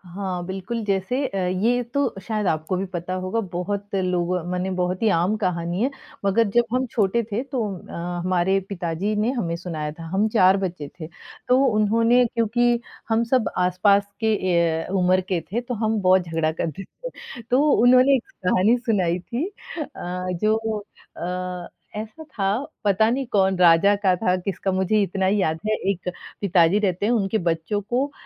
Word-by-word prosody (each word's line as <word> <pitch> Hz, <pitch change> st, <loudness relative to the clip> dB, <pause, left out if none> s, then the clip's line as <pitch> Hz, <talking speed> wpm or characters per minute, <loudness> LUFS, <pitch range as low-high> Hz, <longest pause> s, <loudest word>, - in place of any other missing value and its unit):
हाँ, 185 Hz, -3 st, -3 dB
बिल्कुल 195 Hz, +5 st, -4 dB
जैसे 200 Hz, +8 st, 0 dB
अ, 195 Hz, -, -5 dB
ये 190 Hz, +7 st, +1 dB
तो 280 Hz, -6 st, 0 dB
शायद 215 Hz, -3 st, -1 dB
आपको 160 Hz, +2 st, 0 dB
भी 195 Hz, -, -2 dB
पता 175 Hz, +1 st, -3 dB
होगा 190 Hz, +5 st, -1 dB, 0.2 s
बहुत 200 Hz, +3 st, -3 dB
लोगो 180 Hz, -1 st, 0 dB
मने 180 Hz, +1 st, -1 dB
बहुत 180 Hz, +1 st, -1 dB
ही 220 Hz, -, +4 dB
आम 180 Hz, +6 st, +1 dB
कहानी 175 Hz, 0 st, -1 dB
है, 260 Hz, -, +2 dB, 0.4 s
मगर 205 Hz, +3 st, +3 dB
जब 240 Hz, -, +6 dB
हम 255 Hz, +1 st, +1 dB
छोटे 215 Hz, +1 st, +2 dB
थे 225 Hz, +6 st, -1 dB
तो 270 Hz, -2 st, -3 dB, 0.3 s
अ, -, -, -9 dB, 0.3 s
हमारे 185 Hz, +1 st, +2 dB
पिताजी 180 Hz, +2 st, -2 dB
ने 215 Hz, +4 st, +1 dB
हमें 175 Hz, -10 st, -2 dB
सुनाया 160 Hz, -4 st, -4 dB
था, 165 Hz, +2 st, -10 dB
हम 205 Hz, +3 st, +3 dB
4 190 Hz, -1 st, +6 dB
बच्चे 175 Hz, -5 st, -4 dB
थे। 155 Hz, -, -6 dB, 0.4 s
तो 250 Hz, -, +5 dB
उन्होंने 230 Hz, +2 st, +3 dB
क्योंकि 240 Hz, +1 st, +1 dB, 0.3 s
हम 225 Hz, +1 st, +2 dB
सब 255 Hz, -3 st, +3 dB
आसपास 200 Hz, +3 st, +3 dB, 0.2 s
के 220 Hz, 0 st, +3 dB
ए, 170 Hz, -4 st, +1 dB
उम्र 185 Hz, +1 st, +3 dB
के 175 Hz, -, +1 dB
थे 235 Hz, -, 0 dB
तो 245 Hz, 0 st, -5 dB
हम 220 Hz, 0 st, +1 dB
बहुत 185 Hz, 0 st, +5 dB
झगड़ा 165 Hz, -2 st, -1 dB
करते 160 Hz, +2 st, -4 dB
थे। -, -, -10 dB
तो 255 Hz, +3 st, +5 dB
उन्होंने 255 Hz, +3 st, +6 dB
1 250 Hz, -, -1 dB, 0.2 s
कहानी 210 Hz, +7 st, +4 dB
सुनाई 195 Hz, -8 st, 0 dB
थी 240 Hz, -, -3 dB, 0.3 s
अ, 300 Hz, -1 st, -5 dB, 0.5 s
जो 215 Hz, +1 st, +4 dB, 0.6 s
अ, 180 Hz, 0 st, -4 dB, 0.3 s
ऐसा 220 Hz, +9 st, -7 dB
था 230 Hz, -10 st, -4 dB, 0.4 s
पता 210 Hz, +2 st, +3 dB
नहीं 265 Hz, +3 st, -1 dB
कौन 190 Hz, -2 st, +3 dB
राजा 180 Hz, +3 st, +6 dB
का 185 Hz, -2 st, +4 dB
था, 180 Hz, 0 st, +1 dB
किसका? 190 Hz, +1 st, -2 dB
मुझे 190 Hz, +3 st, +2 dB
इतना 190 Hz, 0 st, -1 dB
ही 200 Hz, +2 st, +2 dB
याद 160 Hz, -3 st, 0 dB
है 215 Hz, -, +2 dB, 0.2 s
1 180 Hz, -1 st, -4 dB, 0.3 s
पिताजी 185 Hz, -1 st, +4 dB
रहते 195 Hz, -2 st, 0 dB
हैं 235 Hz, -, +2 dB
उनके 215 Hz, -2 st, +1 dB
बच्चों 165 Hz, +6 st, -2 dB
को 250 Hz, +7 st, -1 dB
195 Hz, 175 wpm, -23 LUFS, 180-225 Hz, 0.6 s, जब